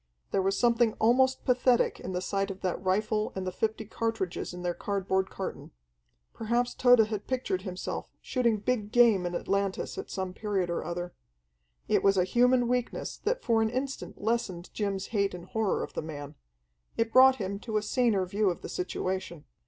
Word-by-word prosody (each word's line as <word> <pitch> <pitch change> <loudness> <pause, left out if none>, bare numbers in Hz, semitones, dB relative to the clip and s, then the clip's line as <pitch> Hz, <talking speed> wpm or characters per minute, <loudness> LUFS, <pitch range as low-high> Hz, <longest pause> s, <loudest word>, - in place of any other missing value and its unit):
There 195 - +2
was 195 +1 +1
something 235 -2 +3
almost 260 +4 +3
pathetic 250 -1 +3
in 185 - -6
the 180 0 -2
sight 195 +1 -1
of 195 -1 -7
that 185 0 -2
rifle 210 +3 0
and 190 -1 -3
the 185 - -2
fifty 220 +3 -2
cartridges 225 -4 -3
in 180 0 -8
their 175 0 0
cardboard 190 0 -1
carton. 190 - -6 0.6
Perhaps 240 +2 0
Tode 245 -3 +6
had 210 -2 -4
pictured 250 -8 -1
himself 185 -2 -5
shooting 235 -4 +1
big 210 -1 -1
game 225 -7 +5
in 175 - -4
Atlantis 195 +1 -1
at - - -7
some 190 -1 -4
period 195 -4 -1
or 170 - -2
other. 175 +1 -4 0.7
It - - +3
was 195 -1 +3
a 180 - +4
human 245 +5 +3
weakness 245 0 -2
that - - -2
for 225 -2 +3
an 220 - +2
instant 265 +3 -4
lessened 205 -6 -2
Jim's 200 -2 -2
hate 200 -3 +1
and 175 -1 -9
horror 220 -3 0
of - - -7
the - - -3
man. 145 -2 -7 0.6
It 225 0 0
brought 260 0 +8
him 200 -4 -4
to 220 0 -2
a 210 - 0
saner 220 -4 +2
view 200 +2 +1
of 175 - -4
the - - -6
situation. 185 -3 -3
205 Hz, 185 wpm, -29 LUFS, 185-235 Hz, 0.7 s, brought